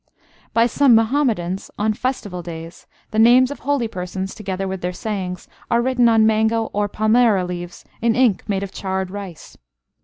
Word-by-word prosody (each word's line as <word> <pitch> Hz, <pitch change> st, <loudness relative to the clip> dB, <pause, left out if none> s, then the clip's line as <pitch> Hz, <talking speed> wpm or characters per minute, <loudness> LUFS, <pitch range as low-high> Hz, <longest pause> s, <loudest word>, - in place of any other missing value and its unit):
By 230 Hz, 0 st, +3 dB
some 250 Hz, +1 st, +4 dB
Muhammadans, 225 Hz, -7 st, 0 dB
on 215 Hz, +1 st, +1 dB
festival 210 Hz, -7 st, -3 dB
days, 165 Hz, 0 st, -9 dB, 0.2 s
the 220 Hz, -, 0 dB
names 250 Hz, +3 st, +6 dB
of 285 Hz, -, -7 dB
holy 280 Hz, -4 st, 0 dB
persons, 190 Hz, -1 st, -5 dB
together 195 Hz, -2 st, -4 dB
with 190 Hz, -1 st, -5 dB
their 180 Hz, -, -2 dB
sayings, 185 Hz, -3 st, -5 dB, 0.2 s
are 235 Hz, -, +3 dB
written 245 Hz, -1 st, +3 dB
on 225 Hz, -1 st, +4 dB
mango 220 Hz, +1 st, +1 dB
or 205 Hz, 0 st, 0 dB
palmyra 215 Hz, -2 st, +3 dB
leaves 175 Hz, -1 st, -7 dB, 0.2 s
in 230 Hz, -1 st, +2 dB
ink 240 Hz, -6 st, +2 dB
made 195 Hz, -1 st, 0 dB
of 195 Hz, -, -6 dB
charred 190 Hz, -1 st, -3 dB
rice. 195 Hz, -5 st, -9 dB
215 Hz, 165 wpm, -20 LUFS, 185-235 Hz, 0.2 s, names